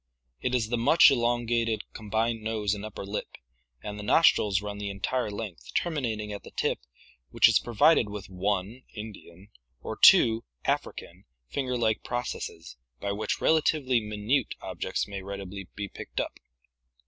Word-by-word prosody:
It 125 Hz, 0 st, 0 dB
is 110 Hz, -3 st, 0 dB
the 120 Hz, 0 st, 0 dB
much 145 Hz, +5 st, +7 dB
elongated 120 Hz, -2 st, +1 dB
combined 110 Hz, +1 st, -1 dB
nose 110 Hz, -2 st, -1 dB
and 105 Hz, -1 st, -5 dB
upper 110 Hz, -2 st, -7 dB
lip, 100 Hz, +2 st, -5 dB, 0.5 s
and 105 Hz, 0 st, -6 dB
the -, -, -6 dB
nostrils 105 Hz, -, +4 dB
run 105 Hz, 0 st, -6 dB
the 100 Hz, -1 st, -3 dB
entire 105 Hz, +5 st, -2 dB
length, 100 Hz, -3 st, -7 dB
terminating 115 Hz, -11 st, -1 dB
at 100 Hz, -, -6 dB
the -, -, -12 dB
tip, -, -, -1 dB, 0.5 s
which -, -, +6 dB
is -, -, +4 dB
provided 120 Hz, 0 st, +3 dB
with 100 Hz, -2 st, -7 dB
one 100 Hz, +5 st, -2 dB
(Indian) 105 Hz, -3 st, -10 dB, 0.3 s
or -, -, -5 dB
two 115 Hz, 0 st, +7 dB, 0.2 s
(African) -, -, -3 dB, 0.2 s
finger 125 Hz, -, -2 dB
like 110 Hz, -2 st, +1 dB
processes 85 Hz, -, -5 dB, 0.2 s
by 100 Hz, -, -2 dB
which 105 Hz, +1 st, -2 dB
relatively 150 Hz, -5 st, +3 dB
minute 105 Hz, +4 st, -1 dB
objects -, -, -3 dB
may 100 Hz, -1 st, -6 dB
readily 100 Hz, 0 st, -7 dB
be 105 Hz, -1 st, -4 dB
picked -, -, -7 dB
up. -, -, -3 dB
110 Hz, 150 wpm, -28 LUFS, 100-120 Hz, 0.5 s, much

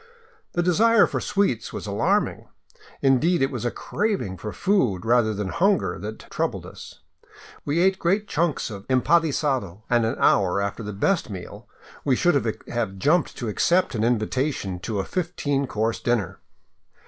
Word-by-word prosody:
The 175 Hz, -, +1 dB
desire 215 Hz, +6 st, +5 dB
for -, -, -3 dB
sweets 195 Hz, -, 0 dB
was -, -, -6 dB
alarming. -, -, 0 dB, 0.6 s
Indeed, 140 Hz, +4 st, +3 dB
it 135 Hz, -, +1 dB
was 125 Hz, -3 st, -4 dB
a -, -, +2 dB
crav 210 Hz, -, -1 dB
ing 95 Hz, -1 st, -5 dB
for 105 Hz, +3 st, -6 dB
food, 120 Hz, -, +1 dB
rather 115 Hz, -1 st, +3 dB
than 105 Hz, -2 st, -3 dB
hunger, 175 Hz, -, +1 dB
that 105 Hz, +4 st, -7 dB
troubled -, -, -2 dB
us. -, -, -12 dB, 0.6 s
We 155 Hz, +4 st, +1 dB
ate 190 Hz, +1 st, +3 dB
great 200 Hz, +5 st, +1 dB
chunks 155 Hz, -6 st, -1 dB
of 100 Hz, -2 st, -9 dB
empanisado, 130 Hz, -, +1 dB
and 120 Hz, -1 st, +4 dB
an 110 Hz, -, 0 dB
hour 95 Hz, -1 st, +3 dB
after 100 Hz, +3 st, -3 dB
the 105 Hz, -1 st, -5 dB
best 165 Hz, -, 0 dB
meal 95 Hz, -4 st, -9 dB, 0.4 s
we 135 Hz, -, +2 dB
should 175 Hz, +6 st, +3 dB, 0.3 s
have 110 Hz, -5 st, -3 dB
jumped 150 Hz, -, +1 dB
to 120 Hz, -, -4 dB
accept 175 Hz, -, +2 dB
an 110 Hz, -2 st, -1 dB
invitation 115 Hz, -3 st, -1 dB
to 105 Hz, +3 st, -4 dB
a 95 Hz, -, -1 dB
fifteen 145 Hz, -, -1 dB
course 110 Hz, 0 st, -1 dB
dinner. 120 Hz, -6 st, -1 dB
125 Hz, 160 wpm, -24 LUFS, 105-170 Hz, 0.6 s, desire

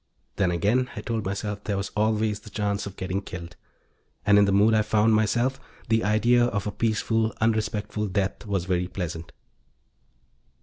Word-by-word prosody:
Then 95 Hz, -3 st, +2 dB
again, 105 Hz, +9 st, +1 dB
I -, -, -5 dB
told 115 Hz, -3 st, -3 dB
myself, 100 Hz, +1 st, -3 dB
there 100 Hz, -2 st, -1 dB
was 100 Hz, -, -3 dB
always 110 Hz, 0 st, +1 dB
the 105 Hz, -, -13 dB
chance 100 Hz, 0 st, -2 dB
of 100 Hz, -, -9 dB
getting 95 Hz, +1 st, -3 dB
killed. 90 Hz, -2 st, -8 dB, 0.7 s
And 105 Hz, 0 st, +6 dB
in 100 Hz, -, +6 dB
the 100 Hz, -, +1 dB
mood 105 Hz, +3 st, +4 dB
I 110 Hz, -, +4 dB
found 110 Hz, +1 st, +3 dB
myself, 120 Hz, +5 st, +1 dB, 0.3 s
the 115 Hz, 0 st, +3 dB
idea 120 Hz, +3 st, +3 dB
of 100 Hz, -5 st, -2 dB
a 105 Hz, -, -2 dB
peaceful, 110 Hz, 0 st, 0 dB
unrespectful 105 Hz, -1 st, 0 dB
death 100 Hz, +3 st, -2 dB
was 95 Hz, -4 st, -1 dB
very 90 Hz, -1 st, 0 dB
pleasant. 85 Hz, -3 st, -5 dB
105 Hz, 170 wpm, -25 LUFS, 100-110 Hz, 0.7 s, And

